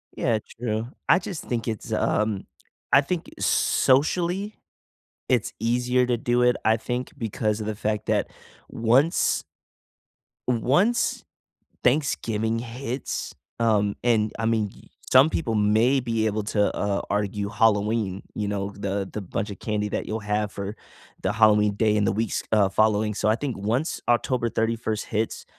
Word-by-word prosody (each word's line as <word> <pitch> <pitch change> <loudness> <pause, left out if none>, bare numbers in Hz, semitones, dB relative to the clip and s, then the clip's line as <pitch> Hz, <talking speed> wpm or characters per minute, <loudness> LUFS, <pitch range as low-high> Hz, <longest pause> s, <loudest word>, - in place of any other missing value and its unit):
Yeah, 115 -2 +1 0.2
true. 110 -1 -2 0.2
I 175 - +6
just 175 -2 -6
think 120 -2 -3
it's, 110 -3 -4
um, 105 -2 0 0.5
I 140 - +7
think 165 +4 -3
socially, 175 +9 +2 0.7
it's 125 -5 +1
easier 125 +3 +1
to 125 -1 +1
do 120 +1 +1
it, 125 0 +4
I 110 0 +4
think, 125 +3 -4
because 110 -2 -1
of 105 - -4
the 110 - -2
fact 105 0 -2
that - - +1 0.4
once 125 +8 +2 1.0
once 140 - +2 0.6
Thanksgiving 115 -5 +1
hits, 125 +2 -4 0.3
um, 105 -3 +2
and, 110 -3 +2
I 115 - -1
mean, 110 -3 +1
y - - -18 0.2
some 130 +4 +7
people 120 -9 -1
may 110 +6 +3
be 115 -2 0
able 110 0 0
to, 105 0 +1
uh, 100 -1 0
argue 105 0 -1
Halloween, 105 -2 +1
you 105 - -2
know, 100 -1 -2
the 100 -1 -2
the 105 - -4
bunch 100 +3 -3
of 100 - -7
candy 105 -1 -1
that - - -3
you'll 110 +1 -3
have 105 0 -1
for 100 +1 -5 0.5
the 95 - 0
Halloween 105 -1 +4
day 105 0 +2
and 105 -1 +2
the - - +2
weeks, 110 +1 -1
uh, 105 -3 +4
following, 105 +1 +2
so 105 - 0
I 110 - +4
think 135 0 -4
once 115 - -1
October 120 0 +1
31st 110 -1 -1
hits, 110 +1 -2
110 Hz, 155 wpm, -25 LUFS, 105-125 Hz, 1.0 s, I